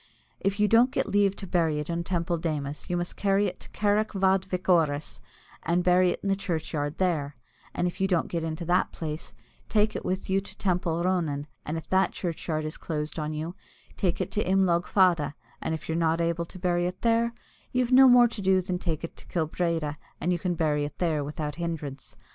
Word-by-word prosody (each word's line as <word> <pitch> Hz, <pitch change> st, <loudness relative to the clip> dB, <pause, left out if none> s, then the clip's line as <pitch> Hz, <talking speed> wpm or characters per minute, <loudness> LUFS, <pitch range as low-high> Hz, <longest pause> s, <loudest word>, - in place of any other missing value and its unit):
If 195 Hz, +1 st, -1 dB
you 210 Hz, -, +4 dB
don't 230 Hz, +4 st, +5 dB
get -, -, -1 dB
leave 200 Hz, -1 st, +2 dB
to 195 Hz, -, -7 dB
bury 165 Hz, -4 st, +1 dB
it 150 Hz, 0 st, -3 dB
in 170 Hz, 0 st, -2 dB
Teampoll 170 Hz, -1 st, -1 dB
Démus, 150 Hz, -3 st, -3 dB
you 175 Hz, -, 0 dB
must 175 Hz, 0 st, -3 dB
carry 200 Hz, 0 st, +2 dB
it 185 Hz, -2 st, -3 dB
to -, -, -12 dB
Carrick 210 Hz, +1 st, +1 dB
fhad 190 Hz, -1 st, +2 dB
vic 185 Hz, -1 st, -4 dB
Orus, 155 Hz, -5 st, +2 dB, 0.4 s
and 175 Hz, +2 st, +1 dB
bury 180 Hz, 0 st, +5 dB
it -, -, -2 dB
in 200 Hz, -, -1 dB
the 195 Hz, -, +3 dB
churchyard 155 Hz, -5 st, -3 dB
there; 155 Hz, -6 st, 0 dB, 0.4 s
and 175 Hz, -, 0 dB
if 175 Hz, +1 st, -3 dB
you 195 Hz, -, +3 dB
don't 180 Hz, -3 st, +1 dB
get 170 Hz, -2 st, -2 dB
it -, -, -1 dB
into 160 Hz, +2 st, -4 dB
that 175 Hz, +2 st, +2 dB
place, 155 Hz, -1 st, -5 dB, 0.4 s
take 215 Hz, 0 st, +2 dB
it -, -, -3 dB
with 185 Hz, +1 st, -2 dB
you 195 Hz, +1 st, +2 dB
to 200 Hz, -, -11 dB
Teampoll 175 Hz, -3 st, 0 dB
Ronan; 160 Hz, -6 st, 0 dB, 0.2 s
and 155 Hz, +2 st, -2 dB
if 160 Hz, -, -7 dB
that 190 Hz, 0 st, +3 dB
churchyard 160 Hz, -3 st, -3 dB
is 155 Hz, -, -5 dB
closed 150 Hz, -1 st, -3 dB
on 150 Hz, 0 st, -2 dB
you, 155 Hz, +3 st, -4 dB, 0.4 s
take 180 Hz, -4 st, 0 dB
it -, -, -2 dB
to 210 Hz, -, 0 dB
Imlogue 185 Hz, -2 st, +2 dB
Fada; 175 Hz, -7 st, +3 dB, 0.3 s
and 160 Hz, -, -1 dB
if 160 Hz, -, -9 dB
you're 160 Hz, -, -1 dB
not 165 Hz, 0 st, +2 dB
able 170 Hz, 0 st, 0 dB
to 185 Hz, -, -11 dB
bury 175 Hz, -1 st, +1 dB
it 180 Hz, +1 st, -7 dB
there, 230 Hz, 0 st, +2 dB, 0.4 s
you've 250 Hz, -1 st, +1 dB
no 265 Hz, +1 st, +8 dB
more 245 Hz, -1 st, +7 dB
to 225 Hz, -3 st, -7 dB
do 190 Hz, -1 st, +4 dB
than 180 Hz, -1 st, -2 dB
to -, -, -13 dB
take 160 Hz, -2 st, -1 dB
it 165 Hz, -, -6 dB
to -, -, -14 dB
Kill 165 Hz, -3 st, 0 dB
Breedya, 165 Hz, -3 st, -1 dB, 0.2 s
and 180 Hz, -, 0 dB
you 175 Hz, -, -1 dB
can 175 Hz, 0 st, -1 dB
bury 150 Hz, -3 st, +1 dB
it 145 Hz, -, -5 dB
there 160 Hz, -4 st, 0 dB
without 150 Hz, +1 st, -4 dB
hindrance. 150 Hz, -5 st, -5 dB
175 Hz, 230 wpm, -27 LUFS, 160-190 Hz, 0.4 s, no